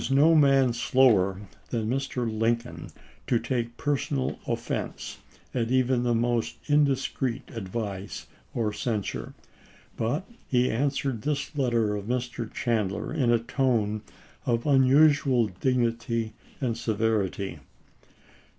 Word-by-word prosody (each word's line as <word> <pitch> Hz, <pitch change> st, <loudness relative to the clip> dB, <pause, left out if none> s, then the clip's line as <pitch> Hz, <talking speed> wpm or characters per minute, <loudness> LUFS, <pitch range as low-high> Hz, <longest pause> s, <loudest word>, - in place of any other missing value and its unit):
no 145 Hz, +5 st, +5 dB
man 135 Hz, -5 st, +5 dB
slower 110 Hz, -6 st, +3 dB, 0.3 s
than 115 Hz, -3 st, -1 dB
Mr. 130 Hz, 0 st, -1 dB
Lincoln 115 Hz, +2 st, -1 dB, 0.4 s
to 120 Hz, -, +3 dB
take 120 Hz, -1 st, -2 dB
personal 140 Hz, -2 st, -1 dB
offense -, -, -3 dB, 0.3 s
at 115 Hz, -2 st, 0 dB
even 130 Hz, -1 st, +2 dB
the 120 Hz, -1 st, +1 dB
most 120 Hz, 0 st, 0 dB
indiscreet 135 Hz, -4 st, +1 dB
advice 100 Hz, -2 st, -5 dB, 0.3 s
or 110 Hz, -3 st, 0 dB
cen 105 Hz, -1 st, -1 dB
sure; -, -, -6 dB, 0.6 s
but 145 Hz, -, -1 dB, 0.2 s
he 125 Hz, 0 st, +2 dB
answered 135 Hz, -1 st, -1 dB
this 145 Hz, +3 st, -2 dB
letter 120 Hz, -6 st, +1 dB
of 100 Hz, -1 st, -5 dB
Mr. 120 Hz, -1 st, -3 dB
Chandler 110 Hz, -1 st, -1 dB
in 130 Hz, -7 st, +2 dB
a 120 Hz, -, +5 dB
tone 115 Hz, -3 st, 0 dB, 0.5 s
of 115 Hz, -1 st, +1 dB
unusual 140 Hz, -2 st, +5 dB
dignity 115 Hz, +1 st, -1 dB, 0.3 s
and 125 Hz, -4 st, -1 dB
severity. 110 Hz, -4 st, -1 dB
120 Hz, 115 wpm, -27 LUFS, 110-135 Hz, 0.6 s, no